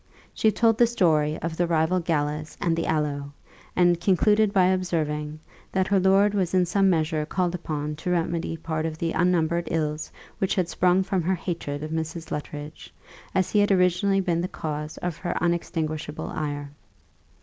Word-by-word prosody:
She 220 - +3
told 225 0 +2
the 240 - +6
story 155 -9 +2
of 165 -1 -2
the 175 - +1
rival 165 +2 +2
galas 155 -2 -2
and 165 -1 +1
the 165 - -2
aloe, 145 -2 -1 0.4
and 175 -1 +3
concluded 210 +3 +3
by 190 -3 +4
observing, 155 -5 -1 0.3
that 190 -1 +1
her 195 0 +2
lord 195 +2 +4
was 190 -3 0
in 180 -1 +4
some 195 +2 +2
measure 155 -3 +1
called 175 +3 -1
upon 150 -3 -4
to 155 - -4
remedy 170 -1 -1
part 160 0 -2
of 155 -1 -5
the 165 0 -1
unnumbered 170 -1 +1
ills 155 -1 -2 0.3
which 190 - 0
had 180 -3 0
sprung 180 +1 +3
from 190 -1 -1
her 185 +3 +1
hatred 155 -5 -4
of 155 - -5
Mrs. 160 +1 -4
Luttridge, 150 +1 -6 0.4
as 185 -1 +1
he 210 - +3
had 205 0 +3
originally 195 +1 +3
been 170 -2 0
the 180 - -1
cause 150 -2 -5
of 175 -3 -2
her 175 - -3
unextinguishable 160 -3 -2
ire. 145 -2 -4
170 Hz, 175 wpm, -25 LUFS, 155-185 Hz, 0.4 s, the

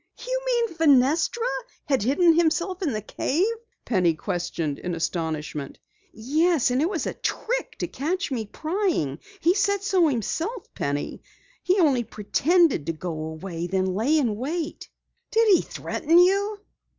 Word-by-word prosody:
"You - - -1
mean 475 -2 +2
Fenestra 320 - +3 0.4
had 270 -5 +1
hidden 325 - +4
himself 340 +3 +1
in 325 -7 0
the 215 -3 -3
cave?" 310 - 0 0.4
Penny 180 -7 +2
questioned 170 -4 -3
in 175 -1 -3
astonishment. 155 -3 -3 0.3
"Yes, 300 +4 +1
it 280 +7 +2
was 365 -6 -2
a - - -2
trick - - -3
to - - -2
catch 340 +6 -2
me 225 -5 -2
prying. 315 - -1 0.2
He 340 +2 +4
said 400 0 +1
so 370 -4 +3
himself, 325 - -3
Penny. 145 +1 -3 0.4
He 370 +2 +2
only 275 -8 +3
pretended 275 - +2
to 165 - 0
go 170 +2 -5
away, 165 +2 -5
then 185 0 0
lay 245 +11 +2
in 235 -8 +1
wait." 310 +6 -4 0.4
"Did 455 0 +3
he 360 - +5
threaten 330 +3 0
you?" 400 +4 +4
290 Hz, 145 wpm, -25 LUFS, -, 0.4 s, he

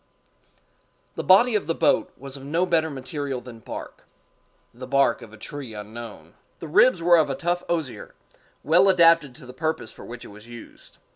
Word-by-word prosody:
The - - -5
body 225 +6 +5
of 210 - 0
the 165 - 0
boat - - +2
was 135 0 -9
of 135 - -10
no 165 +6 0
better 160 -3 +1
material 135 -1 -5
than 120 -2 -12
bark—the 125 +2 -12
bark 140 +1 +2
of 110 - -12
a 110 - -13
tree 130 0 -8
unknown. 110 +2 -9 0.3
The 165 - -7
ribs 175 +3 +4
were 175 0 +6
of 155 -3 +2
a 135 - -2
tough 175 +4 -1
osier, 160 -7 -4 0.5
well 180 +6 +5
adapted 165 -7 +4
to - - -14
the 125 - -11
purpose 160 -4 -3
for - - -13
which 120 0 -9
it - - -11
was 105 +2 -14
used. 120 -1 -13
140 Hz, 185 wpm, -24 LUFS, 125-165 Hz, 0.5 s, were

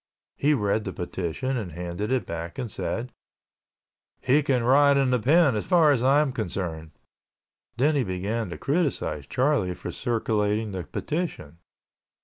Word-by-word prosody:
He 150 +1 +2
read 105 -2 0
the 95 - -4
petition 90 +9 -3
and 95 -8 -5
handed 90 +6 -4
it 130 -1 +1
back 85 0 -6
and 120 -5 -4
said, 120 +5 -3 1.1
"He 135 +4 +3
can 130 -4 +1
rot 140 +3 +5
in 135 -2 +2
the 125 - +2
pen 145 +2 +4
as 105 - -3
far 170 -5 +5
as 130 -5 +2
I 135 +3 +4
am 150 -3 0
concerned." 85 -8 -4 0.9
Then 145 +6 +3
he 140 -3 +2
began 100 +3 -3
to 85 - -6
criticize 135 - -1
Charlie 130 -9 +1
for - - -6
circulating 110 -2 -1
the 95 -3 -5
petition. 145 - -4
115 Hz, 155 wpm, -25 LUFS, 95-140 Hz, 1.1 s, rot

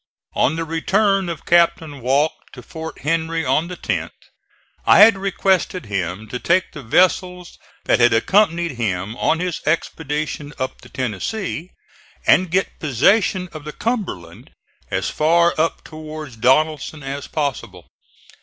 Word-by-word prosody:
On 145 - +2
the 165 - -2
return 195 +4 +1
of 165 -4 -6
Captain 165 -4 +2
Walke 140 +6 0
to 125 - -11
Fort 160 +5 -8
Henry 165 +1 -1
on 145 +6 +1
the 180 0 -7
10th, - - -2 0.7
I - - +6
had 220 +1 +8
requested 190 -2 0
him 95 +1 -3
to 125 - -4
take 175 +6 +1
the 150 - -9
vessels 180 - +1 0.3
that - - +3
had 120 0 +5
accompanied 170 - +2
him 105 -4 -3
on 160 - +1
his 180 -2 -3
expedition 150 -2 -2
up 130 0 -4
the - - -15
Tennessee, 150 - -4 0.6
and 185 -1 +4
get 190 +3 -1
possession 180 - +2
of 155 -2 -8
the 150 0 -7
Cumberland 190 - -4 0.4
as - - -2
far 170 +2 +3
up 165 +1 -1
towards 155 -4 -9
Donelson 150 +5 +1
as 140 +1 -5
possible. 115 - -4
155 Hz, 140 wpm, -20 LUFS, 130-180 Hz, 0.7 s, had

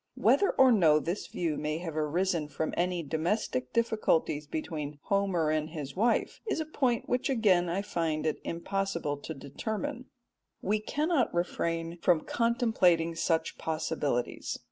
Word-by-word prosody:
Whether 400 - +4
or 265 -1 +6
no 165 -9 +5
this 170 +6 -3
view 165 -4 -2
may 155 +1 -2
have 165 -2 -5
arisen 160 +1 0
from 155 +1 -3
any 175 -1 0
domestic 155 - -1
difficulties 190 -10 +1
between 150 -1 -4
Homer 190 -6 +1
and 155 0 0
his 150 -4 -6
wife 230 +5 +1
is 425 - 0
a 315 - -1
point 260 -6 0
which 250 +3 0
again 195 -9 +3
I 190 +4 -1
find 165 -6 -1
it 155 - -1
impossible 170 -4 -2
to 145 - -7
determine. 220 - -4 0.5
We 210 +3 0
cannot 295 +4 0
refrain 170 -1 -1
from 170 -3 +3
contemplating 220 -9 +2
such 165 0 0
possibilities. 155 -5 -2
170 Hz, 145 wpm, -30 LUFS, 155-215 Hz, 0.5 s, or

